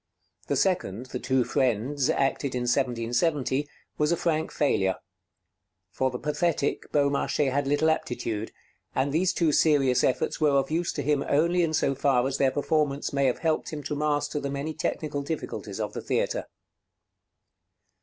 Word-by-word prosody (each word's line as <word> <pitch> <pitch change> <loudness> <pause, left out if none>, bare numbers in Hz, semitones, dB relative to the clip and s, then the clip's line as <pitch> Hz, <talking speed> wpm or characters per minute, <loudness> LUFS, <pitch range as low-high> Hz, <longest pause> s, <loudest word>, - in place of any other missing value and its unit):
The - - 0
second, 130 - 0
'The 125 -1 -5
Two 130 0 +1
Friends,' 130 +2 0
acted 135 -2 0
in 125 - -1
1770, 130 +3 0 0.3
was 150 +1 +2
a 170 - +2
frank 160 -2 0
failure. 95 -10 +1 1.0
For 130 +7 0
the 125 - -5
pathetic, 150 +1 -1
Beaumarchais 140 -1 +1
had 140 +1 0
little 145 +3 +2
aptitude; 115 -8 -1 0.4
and 135 +2 +1
these 180 +3 +2
two 165 -3 +1
serious 140 -5 +3
efforts 130 - 0
were 145 -2 +4
of 135 +1 0
use 170 +2 0
to - - -3
him 145 0 +1
only 170 +3 +2
so 140 -2 +2
far 135 -2 +2
as 135 0 -3
their 135 - +4
performance 145 0 0
may 140 -1 +2
have 125 - +1
helped 160 -1 +1
him 150 -2 -6
to 150 - -3
master 145 0 0
the 140 - -3
many 140 +3 -3
technical 155 -2 -2
difficulties 155 +3 -5
of - - -3
the - - -4
theatre. - - -1
145 Hz, 160 wpm, -27 LUFS, 130-155 Hz, 1.0 s, were